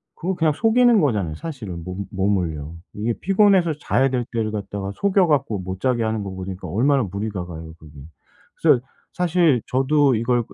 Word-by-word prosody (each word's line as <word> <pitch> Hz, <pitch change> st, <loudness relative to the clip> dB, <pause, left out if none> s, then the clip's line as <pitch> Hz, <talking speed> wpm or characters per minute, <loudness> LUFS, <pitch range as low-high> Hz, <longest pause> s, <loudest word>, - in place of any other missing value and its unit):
그거 185 Hz, +3 st, -2 dB
그냥 160 Hz, -3 st, +2 dB
속이는 230 Hz, +4 st, +4 dB
거잖아요 100 Hz, -, 0 dB
사실은 105 Hz, -, -7 dB
몸 95 Hz, +2 st, -5 dB
몸을요. 90 Hz, -6 st, -1 dB, 0.2 s
이게 110 Hz, +3 st, -1 dB
피곤해서 195 Hz, -4 st, +3 dB
자야 135 Hz, -2 st, +1 dB
될 125 Hz, -2 st, -1 dB
때를 110 Hz, -2 st, -1 dB
갖다가 100 Hz, -1 st, -4 dB
속여 195 Hz, -2 st, +2 dB
갖고 135 Hz, -9 st, +1 dB
못 95 Hz, 0 st, -6 dB
자게 125 Hz, -3 st, +1 dB
하는 110 Hz, -1 st, -1 dB
거 95 Hz, -, -5 dB
보니까 95 Hz, 0 st, -7 dB
얼마나 135 Hz, +5 st, +2 dB
무리가 100 Hz, -1 st, -4 dB
가요 80 Hz, -2 st, -9 dB
그게. 80 Hz, -3 st, -16 dB, 0.6 s
그래서 -, -, +4 dB, 0.3 s
사실 170 Hz, -7 st, +2 dB
저도 135 Hz, 0 st, +3 dB
이걸 120 Hz, +2 st, +1 dB
끄 -, -, -17 dB
115 Hz, 370 characters per minute, -22 LUFS, 95-150 Hz, 0.6 s, 속이는